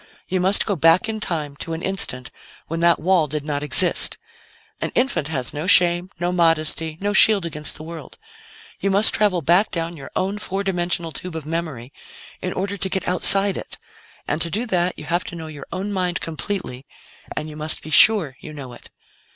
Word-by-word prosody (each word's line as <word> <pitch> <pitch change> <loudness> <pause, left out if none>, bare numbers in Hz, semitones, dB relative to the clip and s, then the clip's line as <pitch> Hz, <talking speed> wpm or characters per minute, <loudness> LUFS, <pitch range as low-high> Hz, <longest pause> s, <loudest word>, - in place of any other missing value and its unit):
You 185 - -1
must 190 +3 +4
go 200 - -1
back 165 +3 +3
in 220 -1 -4
time 155 -8 -4
to 165 - -6
an 160 - -6
instant 160 -10 -3 0.3
when 165 +1 -5
that 170 0 +3
wall 170 -1 +2
did 150 0 -5
not 145 -2 -3
exist. 170 +4 +3 0.6
An - - -2
infant 250 - 0
has 135 -6 -4
no 150 +4 -5
shame, 175 -1 +4
no 175 0 -1
modesty, 165 -2 0
no 205 +1 -2
shield 210 -3 +5
against 150 -2 -5
the 155 - -9
world. 160 -3 -10 0.6
You 195 - -1
must 200 +3 +6
travel 195 -6 +1
back 180 +8 +3
down 170 0 -4
your 140 -3 -10
own 195 +2 -2
four 195 0 -4
dimensional 175 -3 -2
tube 180 +1 -7
of 160 -2 -6
memory 155 -6 -5 0.5
in 185 - -3
order 200 +2 -4
to 190 0 -3
get 190 - -3
outside 195 +2 +6
it, - - -7 0.5
and 150 - -2
to 170 - -1
do 215 +8 -2
that, 180 -5 -1
you 150 - -9
have 175 +4 -1
to - - -8
know 165 -1 -7
your 150 -3 -10
own 200 +2 -4
mind 180 -2 -2
completely, 160 -5 -5 0.5
and 150 - -3
you 155 - -10
must 155 +1 -1
be 155 - -9
sure 170 -4 +6
you 155 - -10
know 135 -4 -9
it. - - -15
170 Hz, 200 wpm, -21 LUFS, 155-190 Hz, 0.6 s, must